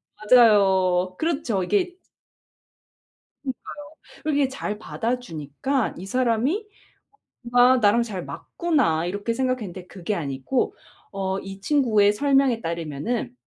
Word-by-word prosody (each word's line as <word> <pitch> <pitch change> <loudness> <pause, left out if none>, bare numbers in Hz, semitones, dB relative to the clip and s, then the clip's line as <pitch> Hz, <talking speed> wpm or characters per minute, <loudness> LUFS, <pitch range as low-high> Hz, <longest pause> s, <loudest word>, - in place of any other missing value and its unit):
맞아요. 190 -5 +4
그렇죠 285 - -1
이게 360 - 0 1.5
그러니까요. 265 - -2 0.7
그렇게 290 -3 +2
잘 255 -5 -5
받아주니까 230 - -3
'이 180 - -7
사람이 255 - 0 0.8
뭔가 245 +1 +4
나랑 225 +1 +4
잘 205 -6 -5
맞구나.' 265 - -1
이렇게 205 +5 -2
생각했는데 230 -9 -3
그게 190 +2 -4
아니고 145 - -2 0.4
어 190 -1 -2
이 195 0 -9
친구의 215 -5 +3
설명에 270 0 +2
따르면은 170 - -3
225 Hz, 265 characters per minute, -24 LUFS, 190-260 Hz, 1.5 s, 맞아요